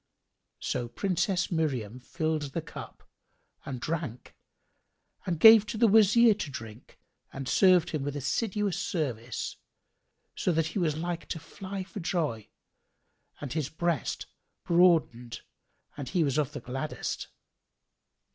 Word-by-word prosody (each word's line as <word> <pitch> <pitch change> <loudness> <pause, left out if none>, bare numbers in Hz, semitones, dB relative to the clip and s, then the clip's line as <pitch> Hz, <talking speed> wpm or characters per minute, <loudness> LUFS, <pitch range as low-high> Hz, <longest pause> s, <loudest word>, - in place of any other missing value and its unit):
So 120 - -2
Princess 180 - -1
Miriam 130 - -1
filled 155 +1 -2
the 165 - -1
cup - - -10 0.6
and 130 -3 -4
drank 150 -4 -4 0.9
and 170 -3 -1
gave 220 +1 +9
the 230 +1 +2
Wazir 220 +2 +6
to 200 -7 -5
drink 110 -3 -10 0.3
and 135 -1 -6
served 180 -1 +4
him 155 - -2
with 145 +1 -3
assiduous 190 - -1
service, 125 - -3 0.8
so - - 0
that 160 0 +1
he - - -1
was 155 -4 0
like 170 +1 -4
to 165 - -4
fly 190 +4 -7
for 195 +2 -8
joy 155 - -2 0.9
and 145 -3 -5
his 150 -4 -1
breast 165 -2 -2 0.4
broadened 165 -9 +2 0.5
and 140 -3 -6
he 180 -3 +2
was 140 0 +1
of 150 -1 -1
the - - -5
gladdest. 135 +4 -4
160 Hz, 130 wpm, -29 LUFS, 135-185 Hz, 0.9 s, gave